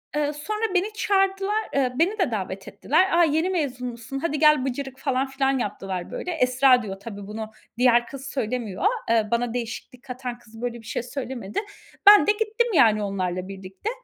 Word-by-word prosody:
Iıı, 295 Hz, 0 st, 0 dB
sonra 425 Hz, +10 st, -3 dB
beni 395 Hz, +4 st, +1 dB
çağırdılar. 395 Hz, 0 st, +1 dB
Iıı, 260 Hz, -2 st, +1 dB
beni 390 Hz, +6 st, +2 dB
de 355 Hz, -10 st, +1 dB
davet 195 Hz, -2 st, -4 dB
ettiler. 325 Hz, -, +2 dB
"A, -, -, +7 dB
yeni 320 Hz, +3 st, +2 dB
mezun 275 Hz, -9 st, -2 dB
musun? 240 Hz, +3 st, -6 dB
Hadi 300 Hz, -1 st, -1 dB
gel 300 Hz, -3 st, +5 dB
bıcırık." 270 Hz, 0 st, -4 dB
falan 270 Hz, -1 st, 0 dB
filan 270 Hz, 0 st, 0 dB
yaptılar, 190 Hz, -5 st, -4 dB
böyle. 360 Hz, -, -4 dB
Esra 255 Hz, -4 st, +4 dB
diyor, 195 Hz, -2 st, -6 dB
tabii 200 Hz, -1 st, -8 dB
bunu, 215 Hz, +1 st, -6 dB, 0.3 s
diğer 240 Hz, -1 st, +4 dB
kız 275 Hz, 0 st, -8 dB
söylemiyor. 240 Hz, -, -3 dB, 0.2 s
Eee, 225 Hz, -2 st, +3 dB
bana 235 Hz, 0 st, 0 dB
değişiklik 245 Hz, +1 st, -6 dB
katan 250 Hz, -2 st, -6 dB
kız 225 Hz, -1 st, -14 dB
böyle 240 Hz, -1 st, -4 dB
bir -, -, -19 dB
şey 235 Hz, -, -3 dB
söylemedi. 245 Hz, -, -4 dB, 0.5 s
Ben 415 Hz, -1 st, +8 dB
de 420 Hz, -, +6 dB
gittim, 445 Hz, +2 st, 0 dB
yani, 220 Hz, -, +5 dB
onlarla 185 Hz, -2 st, -2 dB
birlikte. 195 Hz, -, -6 dB
255 Hz, 180 wpm, -24 LUFS, 225-310 Hz, 0.5 s, Ben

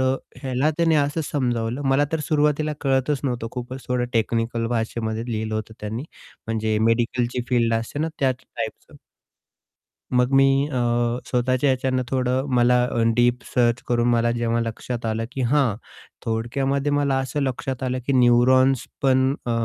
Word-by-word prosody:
अ, 130 Hz, 0 st, +2 dB, 0.3 s
ह्याला 135 Hz, +3 st, +1 dB
त्याने 165 Hz, -1 st, +3 dB
असं 145 Hz, +2 st, +1 dB
समजावलं, 120 Hz, -2 st, -1 dB
मला 135 Hz, +2 st, +3 dB
तर 160 Hz, -, 0 dB
सुरुवातीला 150 Hz, 0 st, +1 dB
कळतच 135 Hz, +1 st, +1 dB
नव्हतं 120 Hz, -3 st, -2 dB
खूपच 125 Hz, +1 st, -6 dB
थोडं 125 Hz, -1 st, +1 dB
टेक्निकल 115 Hz, 0 st, 0 dB
भाषेमध्ये 115 Hz, 0 st, -2 dB
लिहिलं 110 Hz, 0 st, -2 dB
होतं 110 Hz, 0 st, -4 dB
त्यांनी, 110 Hz, +5 st, -4 dB, 0.4 s
म्हणजे 110 Hz, -1 st, 0 dB
मेडिकलची 120 Hz, +1 st, 0 dB
फील्ड 115 Hz, -2 st, +2 dB
असते 115 Hz, +5 st, -3 dB
ना, 160 Hz, -, 0 dB
त्याचं 130 Hz, -2 st, 0 dB
टाइपचं. -, -, -6 dB, 1.2 s
मग 125 Hz, +1 st, +2 dB
मी 135 Hz, +1 st, +4 dB
अ, -, -, -2 dB, 0.5 s
स्वतःच्या 130 Hz, +2 st, +1 dB
ह्याच्यान 130 Hz, 0 st, 0 dB
थोडं 130 Hz, +1 st, 0 dB
मला 125 Hz, 0 st, +4 dB
अ, 120 Hz, -, -1 dB, 0.2 s
डीप 120 Hz, +1 st, +2 dB
सर्च 120 Hz, -1 st, +2 dB
करून 120 Hz, 0 st, +2 dB
मला 120 Hz, 0 st, +2 dB
जेव्हा 115 Hz, 0 st, 0 dB
लक्षात 115 Hz, +1 st, -4 dB
आलं, 110 Hz, +1 st, -1 dB
की 135 Hz, -, -5 dB
हां, 125 Hz, -4 st, +2 dB, 0.5 s
थोडक्यामध्ये 135 Hz, +5 st, -1 dB
मला 145 Hz, -2 st, +1 dB
असं 135 Hz, +2 st, -2 dB
लक्षात 130 Hz, 0 st, -3 dB
आलं, 130 Hz, 0 st, -1 dB
की 140 Hz, -, +1 dB
न्यूरॉन्स 130 Hz, +1 st, +4 dB, 0.2 s
पण 130 Hz, 0 st, +3 dB
अ, -, -, -1 dB
125 Hz, 155 wpm, -23 LUFS, 115-135 Hz, 1.2 s, मी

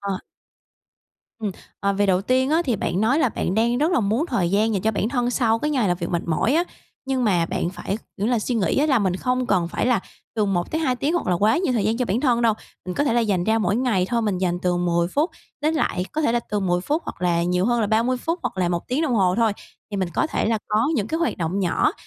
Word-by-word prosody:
ờ. 200 Hz, -2 st, -3 dB, 1.2 s
Ừm, 215 Hz, -3 st, -2 dB, 0.3 s
ờ, 200 Hz, 0 st, +1 dB
về 200 Hz, +1 st, +1 dB
đầu 185 Hz, -1 st, +3 dB
tiên 260 Hz, +5 st, +1 dB
á, 325 Hz, +2 st, +3 dB
thì 245 Hz, -5 st, 0 dB
bạn 180 Hz, 0 st, -1 dB
nói 245 Hz, +8 st, +3 dB
là 265 Hz, -, +3 dB
bạn 190 Hz, -, -2 dB
đang 235 Hz, +2 st, +2 dB
rất 315 Hz, +5 st, +2 dB
là 345 Hz, -, +3 dB
muốn 220 Hz, +9 st, 0 dB
thời 195 Hz, -, 0 dB
gian 215 Hz, +3 st, +2 dB
dành 195 Hz, -3 st, -1 dB
cho 220 Hz, -, +2 dB
bản 210 Hz, 0 st, -1 dB
thân 245 Hz, -1 st, 0 dB
sau 230 Hz, -3 st, +2 dB
cái 300 Hz, +5 st, -1 dB
ngày 255 Hz, -9 st, +1 dB
làm 175 Hz, -, +1 dB
việc 170 Hz, -, -3 dB
mệt 170 Hz, -1 st, 0 dB
mỏi 175 Hz, -, +1 dB
á, 340 Hz, -, +3 dB, 0.4 s
nhưng 260 Hz, -2 st, 0 dB
mà 175 Hz, -5 st, +2 dB
bạn 180 Hz, -1 st, -2 dB
phải, 200 Hz, +2 st, -4 dB, 0.2 s
kiểu 205 Hz, -, -1 dB
là, 240 Hz, 0 st, +2 dB
suy 240 Hz, +3 st, -2 dB
nghĩ 195 Hz, -2 st, +1 dB
á 295 Hz, -, +3 dB
là 265 Hz, -5 st, +3 dB
mình 190 Hz, -3 st, 0 dB
không 250 Hz, +4 st, -1 dB
cần 180 Hz, -6 st, +1 dB
phải -, -, -1 dB
là 245 Hz, -5 st, +3 dB, 0.4 s
từ 215 Hz, -, +2 dB
1-2 250 Hz, -, 0 dB
tiếng 290 Hz, +6 st, -1 dB
hoặc 350 Hz, -, -1 dB
là 180 Hz, -, +2 dB
quá 210 Hz, +5 st, +3 dB
nhiều 355 Hz, -7 st, 0 dB
thời 225 Hz, -5 st, 0 dB
gian 220 Hz, +2 st, +1 dB
cho 250 Hz, -, 0 dB
bản 225 Hz, +2 st, 0 dB
thân 245 Hz, -4 st, +2 dB
đâu. 225 Hz, -2 st, +4 dB, 0.3 s
Mình 180 Hz, -, -3 dB
có 285 Hz, -, +1 dB
thể 235 Hz, -, +1 dB
là 240 Hz, -, +3 dB
dành 200 Hz, -6 st, 0 dB
ra 220 Hz, +2 st, +2 dB
mỗi 205 Hz, -1 st, +1 dB
ngày 225 Hz, -8 st, +1 dB
thôi, 235 Hz, -1 st, 0 dB
mình 205 Hz, -4 st, 0 dB
dành 175 Hz, -1 st, 0 dB
từ 180 Hz, -1 st, +1 dB
10 170 Hz, -1 st, +1 dB
phút 295 Hz, -, 0 dB, 0.3 s
đến 310 Hz, +2 st, +1 dB
lại 185 Hz, -11 st, 0 dB
có 310 Hz, -, -1 dB
thể 295 Hz, -, +2 dB
là 240 Hz, -, +2 dB
từ 210 Hz, -1 st, 0 dB
10 180 Hz, -2 st, +1 dB
phút, 300 Hz, -, -1 dB
hoặc -, -, -7 dB
là 170 Hz, -1 st, +2 dB
nhiều 180 Hz, +1 st, +1 dB
hơn 240 Hz, -1 st, +2 dB
là 210 Hz, -, +1 dB
30 230 Hz, +4 st, +2 dB
phút, 330 Hz, +7 st, -2 dB
hoặc -, -, -3 dB
là 180 Hz, -2 st, +2 dB
1 175 Hz, -1 st, -3 dB
tiếng 265 Hz, +6 st, 0 dB
đồng 285 Hz, -6 st, +1 dB
hồ 185 Hz, -4 st, +3 dB
thôi, 225 Hz, -1 st, +2 dB, 0.4 s
thì 205 Hz, -, -3 dB
mình 190 Hz, -2 st, -1 dB
có -, -, +2 dB
thể 315 Hz, -, -1 dB
là 225 Hz, 0 st, +1 dB
có 215 Hz, +5 st, +2 dB
những 215 Hz, -7 st, 0 dB
cái 320 Hz, +7 st, -2 dB
hoạt 335 Hz, -, 0 dB
động 170 Hz, +3 st, -2 dB
nhỏ 180 Hz, -3 st, +1 dB
220 Hz, 285 wpm, -23 LUFS, 185-255 Hz, 1.2 s, đâu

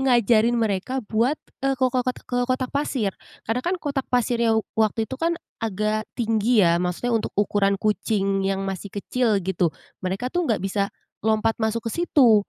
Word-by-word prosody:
ngajarin 240 Hz, -3 st, +4 dB
mereka 225 Hz, +4 st, -1 dB
buat. 230 Hz, +7 st, +1 dB, 0.2 s
eee, 270 Hz, 0 st, +1 dB
ko 255 Hz, -1 st, +1 dB
kotak 255 Hz, 0 st, -1 dB
ke 245 Hz, 0 st, -1 dB
kotak 255 Hz, 0 st, -1 dB
pasir, 260 Hz, -8 st, 0 dB, 0.3 s
karena 225 Hz, +3 st, 0 dB
kan 355 Hz, +7 st, -1 dB
kotak 285 Hz, -5 st, -3 dB
pasirnya 235 Hz, -2 st, +2 dB, 0.2 s
waktu 220 Hz, 0 st, +1 dB
itu 260 Hz, +4 st, -8 dB
kan, 335 Hz, +1 st, +1 dB, 0.2 s
agak 215 Hz, 0 st, -1 dB
tinggi 225 Hz, -2 st, +3 dB
ya. 170 Hz, 0 st, +3 dB
Maksudnya 180 Hz, +7 st, -1 dB
untuk 225 Hz, -, -1 dB
ukuran 200 Hz, -1 st, +2 dB
kucing 200 Hz, -1 st, 0 dB
yang 195 Hz, 0 st, -1 dB
masih 195 Hz, +1 st, -4 dB
kecil 220 Hz, +3 st, 0 dB
gitu. 180 Hz, -2 st, +1 dB, 0.3 s
Mereka 195 Hz, +7 st, -3 dB
tuh 350 Hz, -2 st, 0 dB
enggak 225 Hz, -, +3 dB
bisa 200 Hz, +1 st, 0 dB, 0.3 s
lompat 220 Hz, +1 st, +2 dB
masuk 220 Hz, +1 st, 0 dB
ke 230 Hz, -, -2 dB
situ. 240 Hz, -11 st, +4 dB
225 Hz, 170 wpm, -24 LUFS, 205-250 Hz, 0.3 s, ngajarin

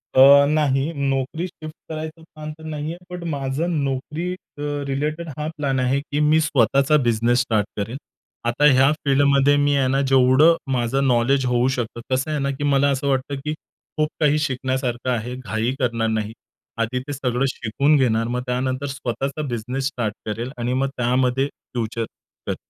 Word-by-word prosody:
अ, 140 Hz, +2 st, +8 dB
नाही. 145 Hz, -1 st, +1 dB
नोकरी 140 Hz, +4 st, -1 dB
शिफ्ट 155 Hz, -2 st, -10 dB, 0.2 s
करायचा 160 Hz, +1 st, -6 dB
प्लॅन 155 Hz, -1 st, -9 dB
तर 160 Hz, -, -14 dB
नाही 155 Hz, 0 st, -4 dB
आहे. -, -, -9 dB
पण 180 Hz, -1 st, -7 dB
माझं 140 Hz, +4 st, -2 dB
नोकरी 150 Hz, +6 st, -3 dB
अ, 145 Hz, -5 st, -13 dB, 0.3 s
रिलेटेड 150 Hz, +4 st, -2 dB
हा 150 Hz, 0 st, -3 dB
प्लॅन 135 Hz, -3 st, 0 dB
आहे. 130 Hz, +2 st, +1 dB
की 145 Hz, 0 st, -3 dB
मी 150 Hz, +1 st, +4 dB
स्वतःचा 140 Hz, +1 st, +3 dB
बिझनेस 120 Hz, +1 st, +2 dB
स्टार्ट 110 Hz, -4 st, 0 dB
करेल. 110 Hz, +6 st, -3 dB, 0.5 s
आता 135 Hz, +5 st, +2 dB
ह्या 135 Hz, +2 st, +5 dB
फील्डमध्ये 140 Hz, 0 st, +4 dB
मी 145 Hz, 0 st, +2 dB
आहे 135 Hz, -2 st, +2 dB
ना, 135 Hz, +1 st, +1 dB
जेवढं 135 Hz, +5 st, +5 dB, 0.2 s
माझं 125 Hz, +2 st, +1 dB
नॉलेज 130 Hz, +2 st, +2 dB
होऊ 125 Hz, 0 st, +2 dB
शकतं, 120 Hz, -1 st, -4 dB
कसं 130 Hz, +4 st, 0 dB
आहे 150 Hz, -, -1 dB
ना? 140 Hz, 0 st, 0 dB
की 140 Hz, +1 st, -5 dB
मला 140 Hz, -1 st, +3 dB
असं 140 Hz, +1 st, -1 dB
वाटतं 135 Hz, +1 st, 0 dB
की 150 Hz, -, -1 dB, 0.4 s
खूप 155 Hz, 0 st, +2 dB
काही 150 Hz, 0 st, +3 dB
शिकण्यासारखं 130 Hz, -3 st, -2 dB
आहे. 120 Hz, +1 st, -2 dB
घाई 120 Hz, -1 st, -2 dB
करणार 115 Hz, -3 st, 0 dB
नाही. 110 Hz, 0 st, -2 dB, 0.5 s
आधी 125 Hz, +3 st, -1 dB
ते 145 Hz, -, -3 dB
सगळं 130 Hz, -1 st, -1 dB
शिकून 140 Hz, +7 st, +1 dB
घेणार. 115 Hz, -3 st, +2 dB
मग 125 Hz, +1 st, -2 dB
त्यानंतर 130 Hz, +2 st, -1 dB
स्वतःचा 135 Hz, +2 st, -3 dB
बिझनेस 125 Hz, +3 st, -2 dB
स्टार्ट 115 Hz, -6 st, -2 dB
करेल 115 Hz, +4 st, -4 dB
आणि 120 Hz, +1 st, -1 dB
मग 135 Hz, +1 st, +1 dB
त्यामध्ये 125 Hz, +2 st, +1 dB
फ्युचर 115 Hz, -4 st, -5 dB, 0.4 s
करेल. -, -, -1 dB
135 Hz, 170 wpm, -22 LUFS, 125-145 Hz, 0.5 s, अ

